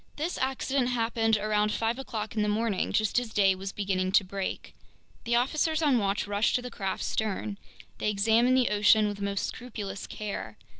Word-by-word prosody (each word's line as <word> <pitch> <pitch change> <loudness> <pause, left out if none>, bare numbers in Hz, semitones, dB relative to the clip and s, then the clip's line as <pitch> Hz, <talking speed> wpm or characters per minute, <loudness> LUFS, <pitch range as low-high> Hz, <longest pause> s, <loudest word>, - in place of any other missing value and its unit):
This 320 +4 -3
accident 265 -1 0
happened 225 -2 +1
around 210 0 +1
five 230 +3 -1
o'clock 220 -5 -5
in 215 - +1
the 210 - +1
morning, 210 -2 0
just 215 +2 +2
as 245 -2 -6
day 195 -3 +4
was 190 +1 -6
beginning 190 -2 -1
to 200 - +6
break. 190 +1 -5 0.5
The 235 +1 +1
officers 310 +6 +1
on 275 -5 +4
watch 200 0 0
rushed 205 +1 +1
to 250 - +1
the 250 - -6
craft's 195 -4 -3
stern. 210 -1 -2 0.4
They - - 0
examined 225 +5 +3
the 255 - +3
ocean 210 +1 +4
with 205 -1 -4
the 200 - -5
most 200 -1 -1
scrupulous 210 -5 -6
care. 210 -1 -6
215 Hz, 190 wpm, -28 LUFS, 200-240 Hz, 0.5 s, to